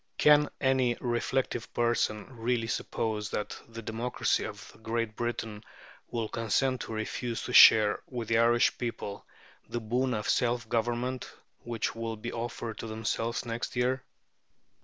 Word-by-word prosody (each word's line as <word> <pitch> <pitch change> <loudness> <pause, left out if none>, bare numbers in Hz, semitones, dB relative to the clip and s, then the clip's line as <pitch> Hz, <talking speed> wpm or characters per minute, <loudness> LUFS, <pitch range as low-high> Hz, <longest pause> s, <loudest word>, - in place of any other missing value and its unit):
Can 150 -1 +6
any 130 -3 +2
reflective 120 0 -1
person 115 -3 +1
really 115 0 0
suppose 110 -2 -2
that 105 - -4
the 115 0 -8
democracy 115 +3 0
of - - -10
Great 115 -1 -2
Britain 115 -2 -3 0.5
will 115 -2 -2
consent 125 +4 0
to - - -6
refuse 115 +2 -3
to - - -5
share 105 -1 +8
with 120 -4 -5
the 115 0 +4
Irish 120 +1 +4
people 115 -4 -5 0.4
the 120 - -2
boon 125 +3 0
of 105 0 -3
self 120 -1 +1
government 120 +3 -1 0.3
which 115 -3 -3
will 115 0 -4
be 115 +2 -6
offered 115 -1 -4
to - - -5
themselves 110 +2 -2
next 115 +2 -4
year? 125 +1 +1
115 Hz, 140 wpm, -30 LUFS, 110-120 Hz, 0.5 s, share